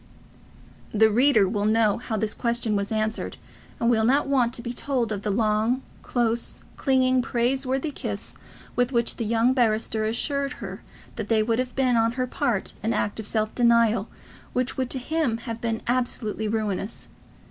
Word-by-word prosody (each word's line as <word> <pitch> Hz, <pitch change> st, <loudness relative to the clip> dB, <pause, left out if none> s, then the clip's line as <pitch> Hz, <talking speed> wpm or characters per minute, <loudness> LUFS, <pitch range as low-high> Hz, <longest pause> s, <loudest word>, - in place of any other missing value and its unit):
The 220 Hz, +1 st, +4 dB
reader 235 Hz, -3 st, +4 dB
will 205 Hz, +1 st, -1 dB
know 215 Hz, -1 st, +3 dB
how 225 Hz, -2 st, -3 dB
this 215 Hz, 0 st, -1 dB
question 235 Hz, -3 st, 0 dB
was 200 Hz, +1 st, -1 dB
answered, 220 Hz, 0 st, -1 dB, 0.4 s
and 235 Hz, -, +1 dB
will 225 Hz, -2 st, +3 dB
not 270 Hz, +6 st, +3 dB
want 260 Hz, -4 st, +2 dB
to 235 Hz, -, -4 dB
be 240 Hz, 0 st, -4 dB
told 245 Hz, -3 st, -1 dB
of 200 Hz, -2 st, -2 dB
the 210 Hz, -, -2 dB
long, 220 Hz, +4 st, +1 dB, 0.2 s
close, 235 Hz, -1 st, -1 dB
clinging, 260 Hz, -2 st, +3 dB
praiseworthy 260 Hz, +4 st, 0 dB
kiss -, -, -6 dB, 0.4 s
with 245 Hz, +1 st, +1 dB
which 235 Hz, -2 st, +1 dB
the 235 Hz, -, -2 dB
young 230 Hz, +3 st, +3 dB
barrister 220 Hz, -3 st, +1 dB
assured 280 Hz, +5 st, -1 dB
her -, -, -7 dB, 0.4 s
that 220 Hz, -2 st, -4 dB, 0.2 s
would 230 Hz, 0 st, +1 dB
have 255 Hz, -1 st, -2 dB
been 255 Hz, -3 st, +3 dB
on 225 Hz, 0 st, +2 dB
her 255 Hz, 0 st, -1 dB
part 240 Hz, -4 st, -1 dB
an 225 Hz, +3 st, 0 dB
act 205 Hz, -, -1 dB
of 215 Hz, -, -5 dB
self 215 Hz, 0 st, -1 dB
denial 235 Hz, -3 st, +3 dB, 0.4 s
which 250 Hz, 0 st, -1 dB
would 260 Hz, -2 st, -2 dB
to -, -, -1 dB
him 265 Hz, -2 st, 0 dB
have 230 Hz, -1 st, -6 dB
been 225 Hz, -1 st, -2 dB
absolutely 235 Hz, -3 st, -1 dB
ruinous. 210 Hz, -1 st, -2 dB
235 Hz, 170 wpm, -25 LUFS, 220-255 Hz, 0.4 s, The